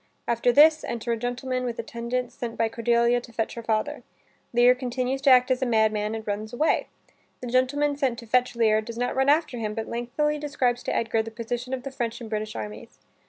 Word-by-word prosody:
After 235 +1 +2
this, 305 +4 +6
enter 235 0 -3
a - - +2
gentleman 250 +2 -3
with 240 -2 -3
attendants 235 +2 -3
sent 235 -1 -6
by 225 -1 +1
Cordelia 235 +1 +2
to 240 - -13
fetch 225 -1 -2
her 235 - -6
father. 220 -1 -1 0.5
Lear 245 +1 +6
continues 255 +1 -2
to 280 - +4
act 255 0 +6
as 255 - +1
a - - +2
madman 220 -1 +1
and 220 -1 -6
runs 215 +1 -3
away. 300 +6 +1 0.5
The - - -7
gentleman 275 +4 +1
sent 265 -4 0
to 235 - -9
fetch 250 +2 +1
Lear, 220 -2 +3
does 230 +1 -8
not 245 +1 -1
run 265 +1 +2
after 295 -5 +2
him, 215 -1 -3
but 225 -1 -4
lengthily 295 +6 -1
describes 255 -4 0
to - - -1
Edgar 225 -1 +1
the 225 - -6
position 240 +2 -5
of 260 -1 -3
the 275 - -6
French 240 -3 -3
and 230 -2 -9
British 215 0 -3
armies. 105 -1 -7
240 Hz, 215 wpm, -25 LUFS, 225-255 Hz, 0.5 s, this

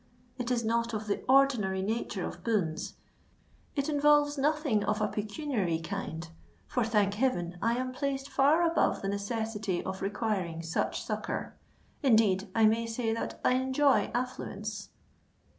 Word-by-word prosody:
It 245 -1 -2
is 240 -2 0
not 230 0 0
of 215 0 -3
the 205 - -2
ordinary 245 -9 +4
nature 215 -2 -2
of 175 - -7
boons—it 215 - -4
involves 295 -1 +4
nothing 285 -6 +1
of 210 +1 0
a 210 - +2
pecuniary 210 - -2
kind; 165 -2 -5 0.4
for, 245 - 0
thank 210 -3 +2
heaven! 180 -7 -1
I 230 +1 +2
am 255 0 -2
placed 275 +1 -2
far 295 +5 +4
above 330 -9 +1
the 195 - -1
necessity 205 -1 -2
of 190 0 -5
requiring 195 -5 -2
such 165 +1 -1
succour. - - -3 0.5
Indeed, 220 -7 +3
I 225 -1 +5
may 225 +2 +3
say 225 0 -1
that 230 - -4
I - - +5
enjoy 260 -3 +3
affluence." 215 -4 -4
225 Hz, 140 wpm, -30 LUFS, 200-260 Hz, 0.5 s, I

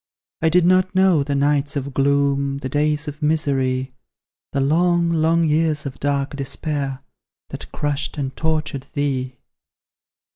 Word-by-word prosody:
I 160 - +3
did 175 +1 +4
not 185 +1 +3
know 190 -5 +4
the 140 0 -2
nights 140 0 +1
of 140 -1 -3
gloom, 140 0 +1
The 130 -1 -5
days 150 +2 0
of 150 +1 -7
misery; 135 -4 0 0.6
The - - -1
long, 170 +4 +2
long 165 +1 +2
years 155 -1 +1
of 135 -1 -6
dark 140 0 -1
despair, 140 -1 -3 0.5
That - - -8
crushed 145 0 -2
and 135 -2 -3
tortured 155 -4 -2
thee. 130 -3 -1
145 Hz, 140 wpm, -21 LUFS, 140-160 Hz, 0.6 s, did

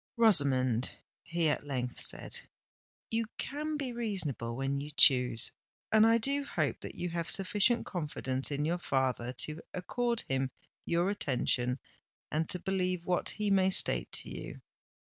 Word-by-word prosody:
"Rosamond," 135 - +3 0.3
he 170 -1 -1
at 145 -1 -1
length 125 -3 -4
said, - - -5 0.7
"you 225 0 0
can 300 +2 -3
be 265 -4 -3
reasonable 180 - -2
when 135 +2 -2
you 145 - -6
choose—and 125 - +4
I 230 0 +5
do 275 +5 0
hope 280 - -2
that - - -8
you 180 - -3
have 170 -1 -3
sufficient 205 +5 +3
confidence 145 -6 -2
in 145 0 -1
your 175 +3 0
father 130 -5 -1
to 150 +6 -3
accord 235 +6 -1
him 135 0 0 0.4
your 175 +3 +1
attention 125 -7 0 0.5
and 155 +1 -1
to - - +5
believe 185 -1 -1
what 180 -1 +1
he 210 -1 -1
may 190 -1 +4
state 190 - +3
to - - -1
you. - - -8
170 Hz, 145 wpm, -31 LUFS, 135-210 Hz, 0.7 s, I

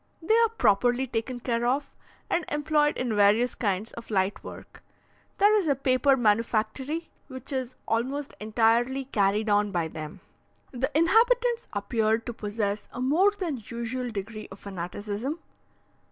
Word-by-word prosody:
They 355 +7 +2
are 460 0 +5
properly 245 - +2
taken 245 0 -4
care 235 -1 -1
of, 270 +4 0 0.3
and 345 - 0
employed 295 0 +1
in 240 -4 -1
various 210 +4 +4
kinds 205 0 -2
of 235 - -10
light 195 -1 0
work. - - -11 0.6
There 415 +1 +5
is 400 -6 +2
a 285 - +3
paper 265 +1 +3
manufactory, 235 +7 0 0.2
which 260 +1 -8
is 260 -1 -3
almost 265 +5 -1
entirely 230 +5 +2
carried 210 -3 +1
on 205 0 +2
by 170 -3 -1
them. 155 -1 -8 0.5
The 260 +2 -1
inhabitants 470 +7 +3
appeared 220 +2 0
to 240 - -4
possess 210 -1 -3
a 240 - -8
more 305 +10 +4
than 355 - -4
usual 235 +3 -4
degree 215 0 -6
of 195 - -9
fanaticism. 205 - -5
240 Hz, 145 wpm, -27 LUFS, 210-280 Hz, 0.6 s, are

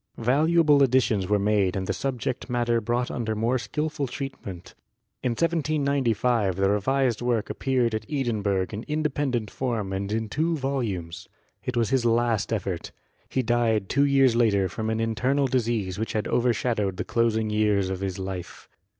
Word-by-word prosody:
Valuable 150 +4 +4
additions 125 -7 +3
were 105 - +4
made 100 -2 +1
and 95 -1 -2
the - - -1
subject 130 -1 -3
matter 120 -1 +1
brought 120 +3 -1
under 115 -2 -2
more 115 +4 +1
skilful 150 +2 -2
treatment. 110 -10 -7 0.5
In 125 - 0
1795 140 - +1
the 95 +1 +2
revised 120 +3 +1
work 120 -3 0
appeared 125 -4 0
at 110 -1 -3
Edinburgh 105 -9 0
in 110 +1 -5
independent 145 -7 -1
form 115 -7 -2
and 100 +1 -3
in 110 0 -1
two 160 +8 0
volumes. 115 - -3 0.3
It 125 -1 -3
was 115 -3 +1
his 130 -2 +2
last 115 -2 +1
effort; 95 -5 -3 0.4
he 130 - 0
died 115 -4 +1
two 140 +1 +3
years 135 -3 +4
later 105 -5 +3
from 110 +4 -4
an 110 0 -1
internal 125 +5 +1
disease 115 -7 -1
which 110 - -2
had 110 0 -1
over 125 0 +2
shadowed 105 -5 -1
the 105 - -2
closing 110 -2 +1
years 105 -3 +2
of 95 - -3
his 95 -2 -3
life. 95 -2 -6
115 Hz, 165 wpm, -25 LUFS, 105-130 Hz, 0.5 s, Valuable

